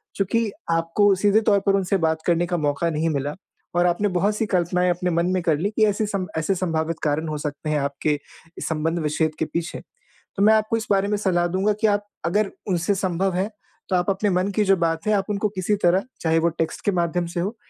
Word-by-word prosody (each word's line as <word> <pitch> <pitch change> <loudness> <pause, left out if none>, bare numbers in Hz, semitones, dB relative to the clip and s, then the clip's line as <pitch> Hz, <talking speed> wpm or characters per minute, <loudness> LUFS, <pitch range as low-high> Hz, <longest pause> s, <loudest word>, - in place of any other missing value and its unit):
चूँकि 215 +2 0 0.2
आपको 165 +5 +3
सीधे 205 +3 +3
तौर 200 - +4
पर 195 - +5
उनसे 195 0 +1
बात 160 -2 0
करने 175 0 +3
का 175 0 -1
मौक़ा 150 +1 0
नहीं 160 +1 0
मिला 145 -1 -2 0.4
और 175 0 +3
आपने 180 +4 +2
बहुत 205 +4 +1
सी 220 - 0
कल्पनाएँ 180 +1 +1
अपने 180 +1 0
मन 170 +1 +1
में 185 - 0
कर 160 -4 +2
लीं 200 +5 -1
कि 220 - +4
ऐसे 210 +1 +1
सम 195 -3 -3
ऐसे 160 +5 0
संभावित 165 -2 -1
कारण 155 +2 0
हो 155 -1 -3
सकते 145 +1 -4
हैं, 155 - +1
आपके 140 +1 -1 0.5
संबंध-विच्छेद 155 -1 -1
के 160 - +1
पीछे। 165 +2 -4 0.6
तो 200 - +1
मैं 215 +1 +7
आपको 220 +1 +2
इस 220 - -5
बारे 195 0 +3
में 210 0 0
सलाह 180 -4 +1
दूँगा 190 +4 +1
कि 220 - +4
आप 205 0 0 0.2
अगर 195 +4 +1 0.2
उनसे 185 +1 +1
संभव 190 0 0
है 190 +4 0 0.4
तो 190 - +1
आप 180 +1 +1
अपने 195 +2 +1
मन 185 0 +1
की 215 - +3
जो 195 -1 +4
बात 165 -1 -1
है 215 - +3
आप 195 -2 +1
उनको 210 0 0
किसी 195 +1 -1
तरह 180 +3 +4 0.2
चाहे 165 0 +2
वो 170 +1 +2
टेक्स्ट 165 - -2
के 205 - +3
माध्यम 175 0 0
से 170 +1 -4
हो 200 +7 -2
180 Hz, 230 wpm, -23 LUFS, 165-200 Hz, 0.6 s, मैं